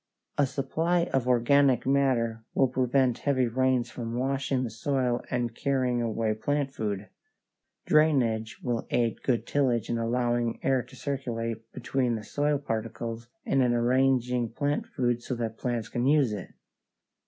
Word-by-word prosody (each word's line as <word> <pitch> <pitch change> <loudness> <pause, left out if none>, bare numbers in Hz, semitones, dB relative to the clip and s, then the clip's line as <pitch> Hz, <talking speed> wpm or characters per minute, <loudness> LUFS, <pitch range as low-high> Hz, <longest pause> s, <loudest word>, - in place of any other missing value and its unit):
A 145 - +4
supply 165 +6 0
of 130 -2 +1
organic 125 +1 +4
matter 125 -5 +1
will 135 - +4
prevent 130 0 +1
heavy 135 -3 +1
rains 125 0 +1
from 115 -1 -5
washing 135 0 0
the 120 - -4
soil 125 +1 -1
and 120 -2 -1
carrying 125 -1 0
away 110 -1 0
plant 140 +5 -1
food. 105 -3 -3 0.8
Drainage 120 -7 +2
will 120 -2 -2
aid 115 -2 0
good 125 -3 0
tillage 125 -6 +1
in 115 - 0
allowing 120 0 0
air 135 -1 +2
to - - -15
circulate 115 -5 -4
between 125 -3 -1
the 110 - -5
soil 145 +6 0
particles 115 -2 -4 0.2
and 135 - +2
in 125 -1 +3
arranging 125 0 +2
plant 145 - -1
food 120 - -1
so 125 - -4
that 115 -2 -4
plants 120 -3 -2
can 120 +3 -1
use 140 -6 +3
it. 100 -4 -6
125 Hz, 150 wpm, -28 LUFS, 115-135 Hz, 0.8 s, A